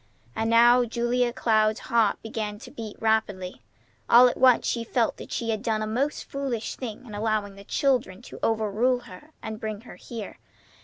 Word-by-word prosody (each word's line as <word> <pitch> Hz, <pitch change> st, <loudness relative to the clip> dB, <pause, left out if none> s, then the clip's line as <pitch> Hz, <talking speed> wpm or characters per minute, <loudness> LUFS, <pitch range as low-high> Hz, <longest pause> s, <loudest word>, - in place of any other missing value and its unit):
And 225 Hz, 0 st, -1 dB
now 240 Hz, +2 st, +6 dB
Julia 240 Hz, +1 st, 0 dB
Cloud's 220 Hz, -3 st, +1 dB
heart 225 Hz, -3 st, +1 dB
began 215 Hz, -2 st, -4 dB
to -, -, -12 dB
beat 220 Hz, -2 st, -7 dB
rapidly. 205 Hz, -5 st, -1 dB, 0.5 s
All 245 Hz, +2 st, +8 dB
at 245 Hz, -, -1 dB
once 255 Hz, -2 st, +4 dB
she 235 Hz, -, -1 dB
felt 230 Hz, 0 st, 0 dB
that -, -, -10 dB
she 230 Hz, -1 st, -2 dB
had 215 Hz, -2 st, -2 dB
done 220 Hz, -2 st, -1 dB
a -, -, -1 dB
most 255 Hz, +7 st, -1 dB
foolish 270 Hz, -5 st, -4 dB
thing 240 Hz, -1 st, -7 dB
in 220 Hz, -, -11 dB
allowing 210 Hz, -1 st, -1 dB
the 200 Hz, 0 st, -13 dB
children 245 Hz, -6 st, 0 dB
to -, -, -11 dB
overrule 225 Hz, +3 st, +1 dB
her 215 Hz, +9 st, -13 dB
and 220 Hz, -1 st, -5 dB
bring 215 Hz, -2 st, -5 dB
her 240 Hz, -, -12 dB
here. 225 Hz, -4 st, -8 dB
225 Hz, 185 wpm, -26 LUFS, 215-240 Hz, 0.5 s, All